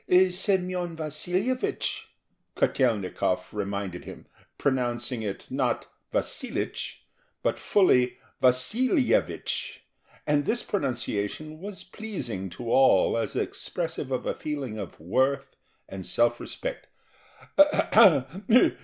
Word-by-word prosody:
"Semyon 180 -2 0
Vasilyevich," 180 - -2 0.5
Kotel'nikov 110 -8 +1
reminded 100 -3 -3
him, - - -10 0.3
pronouncing 125 -2 0
it, 100 -3 -4
not - - 0 0.2
"Vasilich," - - -3 0.4
but - - 0
fully 125 -11 +3 0.2
"Vasilyevich"; 225 - +1 0.4
and 145 -1 +2
this 240 +2 +1
pronunciation 135 - -2
was 195 0 -8
pleasing 125 - -5
to 115 +7 -5
all 130 -8 +5
as 115 - -2
expressive 165 -5 -3
of 130 - -1
a - - 0
feeling 135 -8 -4
of 100 -4 -7
worth 130 - 0 0.3
and 95 -1 -7
self 120 +4 +2
respect. - - -5
135 Hz, 90 wpm, -27 LUFS, 115-180 Hz, 0.5 s, all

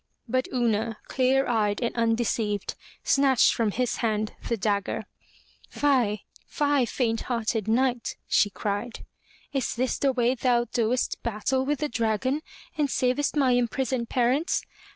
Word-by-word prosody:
But 255 +2 0
Una, 230 -3 0
clear 265 +1 +2
eyed 210 -4 +1
and 235 - -2
undeceived, 225 -3 0 0.3
snatched 275 -3 +4
from 230 -2 +1
his 240 +2 -1
hand 215 -2 -1 0.2
the 235 - +1
dagger. 200 0 -1 0.7
'Tie, 245 -8 +2 0.2
fie, 290 -3 +1
faint 225 -3 -1
hearted 225 -3 -1
Knight!" 245 +1 +1
she 205 - +3
cried. 205 +4 -4 0.5
''Is 270 -3 -1
this 255 +2 -1
the 275 - +3
way 245 -1 +2
thou 240 -1 +2
doest 240 +1 -1
battle 235 +4 -1
with 295 -1 -1
the 300 - +1
dragon, 235 +4 0 0.3
and 295 -2 +1
savest 255 +4 0
my 270 -4 +3
imprisoned 245 0 0
parents? 255 +6 +1
240 Hz, 135 wpm, -26 LUFS, 225-260 Hz, 0.7 s, snatched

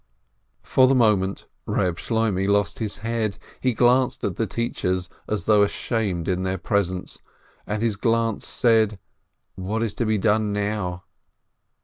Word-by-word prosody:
For 130 -1 +4
the 135 - +3
moment 105 -5 +2 0.2
Keb 90 -2 0
Shloimeh 110 -4 0
lost 100 -4 +1
his 110 -3 -3
head. 110 -3 -1 0.2
He 130 -3 0
glanced 125 +2 +3
at - - -1
the 115 - -1
teachers 95 -5 -2 0.2
as 105 -1 -1
though 105 -1 +4
ashamed 100 -4 -1
in 95 -1 0
their 95 0 -1
presence, 95 -1 -1 0.5
and 105 +1 -2
his 110 -3 0
glance 115 0 0
said, 110 -3 +2 0.6
"What 105 +5 -2
is 110 -3 -2
to 120 - -2
be 110 0 +2
done 105 +1 +2
now?" 100 -3 -2
105 Hz, 145 wpm, -24 LUFS, 95-115 Hz, 0.6 s, For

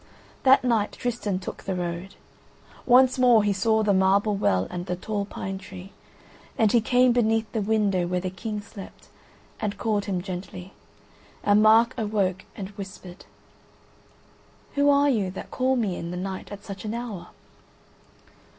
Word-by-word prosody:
That 265 0 +5
night 230 -4 +1
Tristan 235 -6 -2
took 185 - -7
the 190 - -3
road. 175 +1 -4 0.7
Once 255 +1 +5
more 240 -4 +5
he 205 -1 +2
saw 220 +3 +2
the 205 -1 +2
marble 195 +2 +3
well 95 - +1
and 180 +1 -5
the 180 - -1
tall 200 +2 -3
pine 195 -1 -6
tree, 190 -1 -11 0.7
and 220 -2 +3
he 235 - +4
came 250 +2 +4
beneath 225 -2 +1
the 220 - -1
window 200 -4 +1
where 180 +1 -1
the 185 0 -4
King 210 +3 -5
slept, 205 -2 -12 0.5
and 205 -1 -3
called 210 -3 -1
him 185 -3 -2
gently, 185 0 -7 0.7
and 205 +1 +4
Mark 225 +3 +5
awoke 200 -4 -1
and 195 -2 -6
whispered: 190 -3 -10 1.5
"Who 285 0 +3
are 285 0 +4
you 215 -9 +1
that 190 - -8
call 260 +1 +1
me 210 -7 -1
in 170 - -5
the 180 - -5
night 190 +2 -5
at 205 0 -8
such 195 -2 -8
an 215 +1 -4
hour?" 215 -8 -6
205 Hz, 160 wpm, -25 LUFS, 190-225 Hz, 1.5 s, That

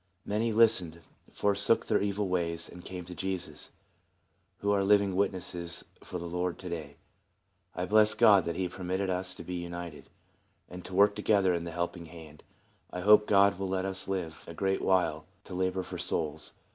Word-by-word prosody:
Many 110 +3 0
listened, 95 -7 +3 0.3
forsook 100 +2 +1
their - - +2
evil 100 0 -1
ways, 85 -2 -1
and 90 0 -12
came 90 -1 -7
to 90 - -8
Jesus, 95 +1 -5 0.9
who 100 - 0
are 100 -1 +2
living 100 -1 +3
wit 100 +2 +2
nesses 85 -2 -6 0.2
for 90 - -6
the 85 - -6
Lord 90 +1 -2
to 90 - -8
day. 75 -4 -6 0.8
I 90 - -2
bless 110 +2 +4
God 100 -4 +6
that 85 - -2
he 95 -1 -1
permitted 95 +1 -2
us 90 0 -3
to - - -9
be 90 - -6
united, 85 -2 -6 0.6
and 90 0 -9
to 95 - -7
work 100 +1 +6
together 100 -3 +2
in 85 -1 -2
the 85 - -5
Helping 85 0 -3
Hand; 80 -2 -12 0.5
and 90 - -5
I - - -8
hope 105 0 +7
God 100 -1 +4
will 95 -1 -2
let 95 0 -1
us 95 -1 -4
live 90 -5 -4
a 85 - -8
great 95 +3 0
while 90 -5 +1 0.2
to - - -10
labor 95 0 -1
for - - -7
souls. 80 -1 -3
90 Hz, 190 wpm, -30 LUFS, 85-100 Hz, 0.9 s, hope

